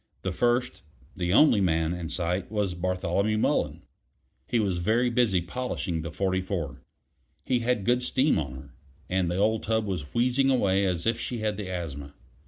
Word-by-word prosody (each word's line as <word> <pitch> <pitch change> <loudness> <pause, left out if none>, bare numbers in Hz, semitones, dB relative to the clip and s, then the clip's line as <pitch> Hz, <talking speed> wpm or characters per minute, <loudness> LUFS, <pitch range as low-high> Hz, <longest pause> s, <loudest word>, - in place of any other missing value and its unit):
The 95 - -1
first 120 0 0 0.3
the 90 -1 -1
only 110 0 +6
man 80 -2 +1
in 85 -2 -5
sight 90 +2 -2
was 105 -4 0
Bartholomew 95 +4 0
Mullen. - - 0 0.6
He 120 - +1
was 95 -5 0
very 115 +7 +2
busy 115 -7 +2
polishing 90 -4 -3
the 85 - -5
44. 95 -6 -2 0.6
He 125 -2 +1
had 120 -4 0
good 125 +3 +3
steam 130 - +2
on 70 -4 -4
her, 65 - -12 0.4
and 95 -2 +1
the 90 - -1
old 110 +2 +2
tub 110 0 0
was 90 -8 -4
wheezing 125 +3 +2
away 100 -7 +2
as 90 -2 -1
if 115 +1 +1
she 120 -3 -3
had 105 -1 0
the 100 -2 -5
asthma. 70 -6 -5
95 Hz, 175 wpm, -27 LUFS, 90-115 Hz, 0.6 s, only